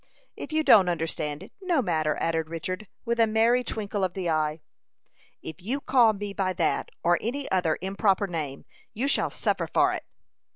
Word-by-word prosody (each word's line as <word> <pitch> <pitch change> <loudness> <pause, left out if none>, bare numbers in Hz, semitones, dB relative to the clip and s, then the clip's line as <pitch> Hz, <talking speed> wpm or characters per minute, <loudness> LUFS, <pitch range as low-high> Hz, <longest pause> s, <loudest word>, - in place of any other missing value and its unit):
"If - - -8
you 315 0 +1
don't 195 -10 +6
understand 155 -3 -3
it, - - -13
no 360 -5 +1
matter," 160 - 0
added 165 -1 -1
Richard, 185 +5 -5 0.2
with 235 0 -1
a 225 - +5
merry 230 +3 +3
twinkle 205 -3 -3
of 185 -1 -1
the 180 -3 -1
eye. 155 0 0 0.8
"If 160 +3 -8
you 245 +10 -2
call 245 -5 +4
me 205 0 -5
by 190 -2 -1
that, - - 0
or 175 +1 +3
any 270 +5 -3
other 180 -4 +2
improper 195 +1 +1
name, 155 -7 -5 0.3
you 250 +6 0
shall - - +1
suffer - - -1
for - - +3
it." - - -3
190 Hz, 180 wpm, -26 LUFS, 165-230 Hz, 0.8 s, don't